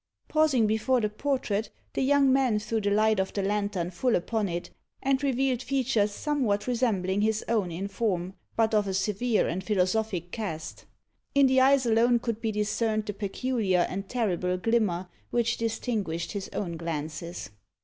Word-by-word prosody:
Pausing 305 -7 +3
before 220 +4 +2
the 215 -2 0
portrait, 225 -4 -1 0.2
the - - -1
young 275 0 +4
man 260 -5 +3
threw 220 +1 -2
the 205 - +1
light 215 0 +3
of 190 0 -1
the 200 - -1
lantern 200 -3 -1
full 240 +7 +1
upon 210 +2 -1
it, 175 +1 -4 0.3
and 270 0 +2
revealed 265 -2 +1
features 255 -5 +1
somewhat 245 -5 0
resembling 205 -6 0
his 220 0 0
own 210 -6 0
in 185 +4 -3
form, 190 -3 -1 0.2
but 225 0 +2
of 210 -2 +3
a 190 - -1
severe 210 +3 +1
and 185 +3 -3
philosophic 185 -2 0
cast. 195 -9 -5 0.5
In 280 -1 +6
the 260 0 +4
eyes 270 0 +5
alone 235 +1 +4
could 230 -1 -3
be 225 -2 0
discerned 215 +1 0
the 205 - -3
peculiar 200 -2 0
and 195 +1 -5
terrible 185 -6 0
glimmer 190 -3 +1 0.2
which 235 -1 +1
distinguished 220 -7 -2
his 200 -2 -5
own 170 -5 -3
glances. 160 -3 -5
215 Hz, 165 wpm, -27 LUFS, 190-240 Hz, 0.5 s, In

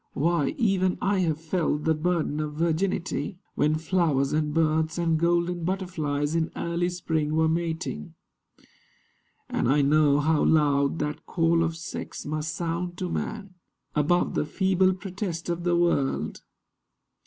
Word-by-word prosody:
Why, 160 -2 +1
even 190 -5 +2
I 195 0 +1
Have 160 -4 0
felt 160 -2 -1
the 160 - +3
burden 160 -1 -1
of 150 -1 -3
virginity, 170 +3 -1 0.2
When 150 +1 +2
flowers 155 -4 +1
and 150 -1 +1
birds 160 +1 +1
and 165 -2 +1
golden 170 +1 +1
butterflies 160 -6 -1
In 165 -1 +1
early 170 +1 -1
spring 160 -4 -1
were 160 0 +3
mating; 160 - -3 1.3
and - - 0
I 145 +1 +4
know 145 0 +4
How 155 +1 +2
loud 145 -1 +3
that 150 0 -4
call 165 -1 +2
of 165 0 -2
sex 165 - -6
must 155 +1 -3
sound 175 +1 -3
to 180 - -3
man 205 -3 -4 0.4
Above 155 +4 +2
the 150 - -1
feeble 190 0 +2
protest 185 -3 -5
of 170 0 -2
the 175 -1 +3
world. 170 -6 0
165 Hz, 140 wpm, -26 LUFS, 150-175 Hz, 1.3 s, I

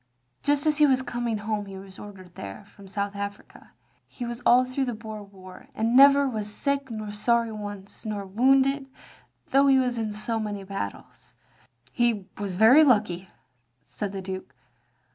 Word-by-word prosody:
Just 290 0 +1
as 305 -1 +2
he 300 -1 +6
was 260 -1 +2
coming 240 -3 -2
home 210 -1 -3
he 195 -1 -8
was 190 -1 -10
ordered 190 -4 -11
there, 100 - -8
from 200 -1 -16
South 200 +1 -3
Africa. 200 0 -8 0.3
He 245 - -7
was 240 0 -5
all 250 +1 +6
through 255 +2 -2
the 245 -3 -3
Boer 215 -1 -8
War. 190 -2 -13
And 225 +2 0
never 280 +1 +7
was 215 -4 -3
sick 280 +4 -1
nor 215 -2 -5
sorry 230 +2 +1
once, 205 -2 -8
nor 210 -2 -4
wotinded, 270 +6 +3 0.6
though 275 +1 +5
he 270 -1 +6
was 250 -2 +1
in 220 -1 -2
so 215 +2 -2
many 205 -2 -4
battles. 195 0 -7 0.3
" - - -34
"He 235 -5 +1
was 200 -3 -3
very 225 +10 +7
lucky," 205 - +2 0.6
said 205 -2 -5
the 195 -1 -6
Duke. 185 -7 -7
215 Hz, 175 wpm, -26 LUFS, 200-255 Hz, 0.6 s, never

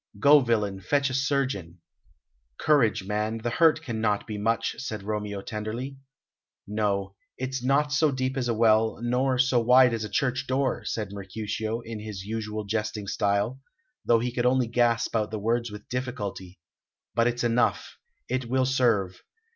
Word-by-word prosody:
Go, 145 +6 +7
villain, 105 -6 0
fetch 140 +8 +1
a - - -4
surgeon." 130 - -1 0.8
"Courage, 130 -10 +3
man, 105 +3 -2
the 115 +1 -3
hurt 160 +4 +3
cannot 110 -4 -1
be 110 - -5
much," 115 +2 0
said 110 -6 -5
Romeo 105 -1 -3
tenderly. 120 +5 -5 0.7
"No, 100 -2 -1 0.2
it's 130 0 -3
not 140 +3 +2
so 150 +1 +3
deep 130 -1 -2
as 130 -3 -1
a 120 - +1
well, 110 0 +3
nor 125 +2 +1
so 125 -1 +3
wide 125 +1 +5
as 115 -1 -2
a 105 - -5
church 135 +5 -1
door," 130 0 0
said 105 -3 -3
Mercutio, 105 +3 -4
in 115 -2 -7
his 105 -3 -7
usual 110 0 -4
jesting 105 0 -2
style, 100 +6 0 0.4
though 120 - +4
he 120 +2 -1
could 120 0 +1
only 130 0 +3
gasp 115 0 +1
out 105 -2 +1
the 110 - -4
words 115 +3 0
with 105 0 -10
difficulty; 105 -7 -5 0.6
"but 115 0 +3
it's 120 0 -1
enough; 120 0 0 0.3
it 130 -1 -2
will 130 +1 +2
serve. 115 -8 +1
115 Hz, 165 wpm, -26 LUFS, 105-130 Hz, 0.8 s, Go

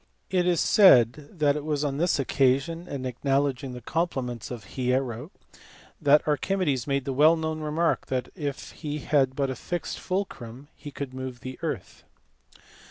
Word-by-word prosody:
It 180 -2 +2
is 175 -3 +3
said 140 - +5
that 150 -5 +2
it 150 - -3
was 150 -1 -1
on 140 -2 -1
this 170 +3 +2
occasion, 140 +5 +1
in 135 -5 -5
acknowledging 135 +1 -1
the 125 - -8
compliments 130 - -2
of 120 -4 -6
Hiero, 125 +1 -2 0.7
that 145 +2 +4
Archimedes 150 -4 0
made 140 -2 0
the 135 - -2
well 155 +5 +6
known 160 -1 -3
remark 155 +2 0
that 130 -2 -3
had 145 -6 -3
he 150 -1 -7 0.3
but 135 -1 0
a - - -4
fixed 175 +7 -4
fulcrum 145 - -4
he 145 - -9
could 140 -2 -6
move 130 -1 -6
the 130 0 -7
earth. - - -5
140 Hz, 160 wpm, -26 LUFS, 130-155 Hz, 0.7 s, well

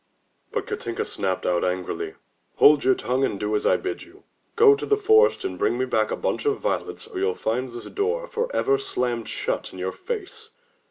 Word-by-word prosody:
But - - -2
Katinka 115 0 -3
snapped 95 -2 -2
out 90 -1 +1
angrily, 90 0 -2 0.4
"Hold 145 -1 +6
your 130 - +4
tongue 130 +2 -1
and 100 -7 0
do 105 0 -1
as 105 - +1
I - - +4
bid 385 0 -4
you. - - -15 0.3
Go 440 -2 +7
to 420 - -3
the 420 - +3
forest 440 0 +4
and 385 - -4
bring 120 - +1
me 130 - 0
back 110 -4 +1
a - - -1
bunch - - -2
of 420 - +2
violets - - -3
or 435 -4 -6
you'll 430 +3 +1
find 125 +4 -2
this 120 0 -8
door 455 +5 -1
forever 465 -4 0
slammed 125 - -2
shut - - -2
in - - -11
your 95 +1 -2
face!" 435 -6 -6
150 Hz, 205 wpm, -24 LUFS, -, 0.4 s, Go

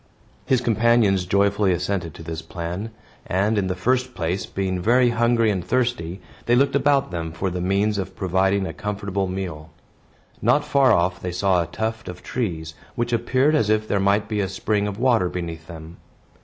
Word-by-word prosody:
His 130 -2 +3
companions 110 -5 +3
joyfully 100 +1 +2
assented 90 -2 -2
to - - -10
this 80 -1 -5
plan; 90 +5 -5 0.4
and, 100 +4 +1
in 100 -3 0
the 90 - -2
first 125 +6 0
place, 85 +2 -2
being 95 -2 -2
very 120 +4 +4
hungry 115 -1 +2
and 95 -3 -2
thirsty, 115 -5 -1 0.3
they 120 - +4
looked 140 +2 +3
about 140 -4 +2
them 85 -2 -4
for 95 +3 -3
the 90 0 -3
means 100 +3 +1
of 95 0 -5
providing 95 0 +1
a 80 - -5
comfortable 100 0 -3
meal. 90 -5 -5 0.7
Not - - +3
far 135 -2 +4
off 90 -2 +2
they 90 - -3
saw 90 0 +2
a 85 - -3
tuft 110 +5 -4
of 90 0 -9
trees, 80 -10 -3 0.2
which 120 0 -1
appeared 130 +5 +2
as 130 -9 +2
if 110 0 +1
there 100 - +1
might 100 +2 +2
be 105 -1 -2
a 95 -2 0
spring 105 +2 -1
of 100 -1 -5
water 115 -7 +2
beneath 85 -2 -6
them. 80 0 -10
100 Hz, 185 wpm, -23 LUFS, 90-115 Hz, 0.7 s, very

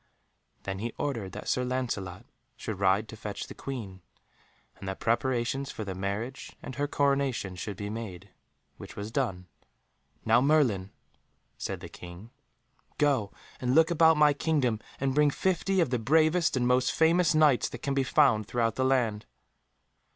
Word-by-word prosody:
Then 95 0 -4
he 115 +2 -4
ordered 115 -10 -3
that - - -8
Sir 125 - +1
Lancelot 120 -6 -3 0.3
should 105 -3 -6
ride 100 +2 +2
to 110 - -9
fetch 105 -2 -6
the - - -10
Queen, 105 -9 -7 0.7
and 95 - -10
that 95 - -4
preparations 125 +3 0
for 110 - -6
the 95 - -4
marriage 100 +8 -4
and 130 - -6
her 145 +2 -1
coronation 140 -9 0
should 95 +2 -6
be 100 - -4
made, 105 -5 -7 0.5
which - - -10
was 105 +2 -6
done. 110 -9 -2 0.8
"Now, 115 +2 +5
Merlin," 130 -10 +2 0.7
said - - -5
the - - -7
King, 90 +6 -11 0.7
"go 135 -9 +1 0.3
and 125 +1 0
look 160 +1 +5
about 160 -1 +5
my 150 -1 +5
kingdom 140 -7 0 0.2
and 135 -1 0
bring 150 +1 +4
fifty 190 +4 0
of 150 -7 0
the 125 - +1
bravest 155 +5 +3
and 125 -1 +1
most 125 0 +3
famous 165 0 +3
Knights 150 -5 +4
that - - -9
can 140 - 0
be 135 - +2
found 130 -7 +3
throughout 115 -2 0
the 130 - +1
land." 120 -5 +1
125 Hz, 165 wpm, -28 LUFS, 105-145 Hz, 0.8 s, Now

